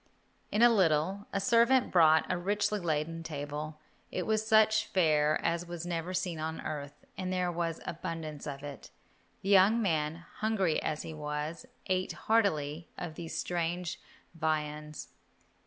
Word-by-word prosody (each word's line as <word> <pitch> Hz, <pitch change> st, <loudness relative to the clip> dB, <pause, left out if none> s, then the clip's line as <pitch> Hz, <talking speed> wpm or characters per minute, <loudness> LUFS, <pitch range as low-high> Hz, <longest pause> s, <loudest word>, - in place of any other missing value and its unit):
In 215 Hz, +3 st, +3 dB
a 240 Hz, -, +9 dB
little 190 Hz, 0 st, +2 dB
a 195 Hz, -, 0 dB
servant 235 Hz, +5 st, +4 dB
brought 160 Hz, -3 st, +6 dB
a 180 Hz, -, 0 dB
richly 205 Hz, +3 st, 0 dB
laden 165 Hz, -1 st, -1 dB
table. 150 Hz, 0 st, -5 dB, 0.3 s
It 180 Hz, -, -2 dB
was 215 Hz, 0 st, +1 dB
such 220 Hz, 0 st, +4 dB
fare 155 Hz, -5 st, +3 dB
as 170 Hz, +1 st, 0 dB
was 175 Hz, -1 st, -5 dB
never 175 Hz, 0 st, -3 dB
seen 175 Hz, -3 st, -2 dB
on 160 Hz, +1 st, -3 dB
earth, 145 Hz, -1 st, -6 dB
and 185 Hz, -1 st, -2 dB
there 180 Hz, -1 st, 0 dB
was 165 Hz, -1 st, -2 dB
abundance 165 Hz, -4 st, -5 dB
of 140 Hz, -1 st, -6 dB
it. 145 Hz, -1 st, -8 dB, 0.5 s
The 195 Hz, -, -2 dB
young 200 Hz, +3 st, +6 dB
man, 165 Hz, -4 st, -1 dB
hungry 210 Hz, -7 st, +1 dB
as 155 Hz, -, -2 dB
he 160 Hz, -, -6 dB
was, 150 Hz, +7 st, -4 dB, 0.2 s
ate 185 Hz, -1 st, 0 dB
heartily 165 Hz, -8 st, 0 dB
of 175 Hz, -3 st, -5 dB
these 165 Hz, +1 st, -6 dB
strange 175 Hz, 0 st, -2 dB, 0.3 s
viands. 150 Hz, -2 st, -3 dB
170 Hz, 150 wpm, -31 LUFS, 155-190 Hz, 0.5 s, a